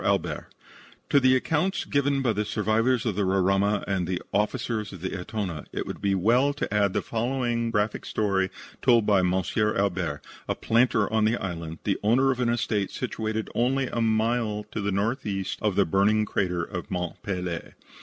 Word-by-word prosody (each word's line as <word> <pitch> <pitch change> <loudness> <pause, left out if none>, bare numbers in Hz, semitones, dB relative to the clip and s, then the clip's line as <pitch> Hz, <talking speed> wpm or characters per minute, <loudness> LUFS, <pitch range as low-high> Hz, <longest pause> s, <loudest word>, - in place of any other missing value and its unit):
ALBERT - - 0 0.6
To 140 - +6
the 130 -1 +5
accounts 160 +8 0
given 140 -1 +1
by 120 -3 +2
the 105 +1 0
survivors 110 +4 +1
of 110 -5 0
the 105 - +1
Roraima 95 +2 +2
and 95 -3 0
the 90 0 -1
officers 105 +1 -1
of 95 - -10
the 95 - -3
Etona, 95 -4 -4
it - - -3
will - - -4
be 100 0 +1
well 120 +9 +3
to 140 - -3
add 100 -2 +2
the - - 0
following 120 0 -1
graphic 105 -1 -1
story 95 -3 +1 0.3
told 120 -4 +4
by 100 -2 +4
M. 90 -1 +2
Albert, 95 -5 0 0.2
a - - 0
planter 115 -2 +2
of 110 -1 +1
the 115 +2 +2
island, 85 -3 -5
the 100 - 0
owner 125 +6 +3
of 130 - -3
an 125 -2 +1
estate 110 -4 0
situated 110 -3 -3
only 130 +2 +1
a 120 - -2
mile 110 -1 +1
to - - -3
the 100 0 -1
northeast 100 -2 -2
of 105 -3 +1
the 100 -1 +4
burning 100 +5 +3
crater 90 -4 -1
of 90 +3 -6
Mont 90 -3 -3
Pelee. 90 -4 -4
105 Hz, 185 wpm, -26 LUFS, 95-120 Hz, 0.6 s, To